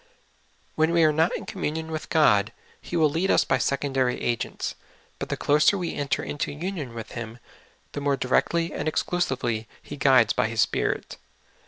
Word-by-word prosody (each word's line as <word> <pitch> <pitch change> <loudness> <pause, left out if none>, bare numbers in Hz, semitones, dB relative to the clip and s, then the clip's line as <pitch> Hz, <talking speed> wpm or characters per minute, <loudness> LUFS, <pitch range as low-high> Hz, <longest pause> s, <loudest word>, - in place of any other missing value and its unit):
When 160 +2 +2
we 170 -1 +4
are 155 -1 +4
not 160 +3 +2
in - - -9
communion 160 -3 -4
with 155 -1 -5
God, 110 -10 +4 0.3
He 175 - -4
will 160 -2 +5
lead 165 +6 -1
us - - +4
by 135 - +1
secondary 135 -1 0
agents; 120 -1 -2 0.5
but - - -5
the - - -2
closer 150 +7 +3
we 175 -3 -3
enter 140 -2 -1
into 145 - -3
union 150 -5 -5
with 115 -1 -7
Him, 115 -1 -6 0.5
the 145 - -5
more 140 -1 +1
di 130 - -3
rectly 170 +5 +1
and - - -3
exclusively 130 -10 -1
He 145 - -9
guides 130 -5 +5
by - - +1
His 115 0 0
spirit. - - -1
145 Hz, 180 wpm, -25 LUFS, 125-160 Hz, 0.5 s, will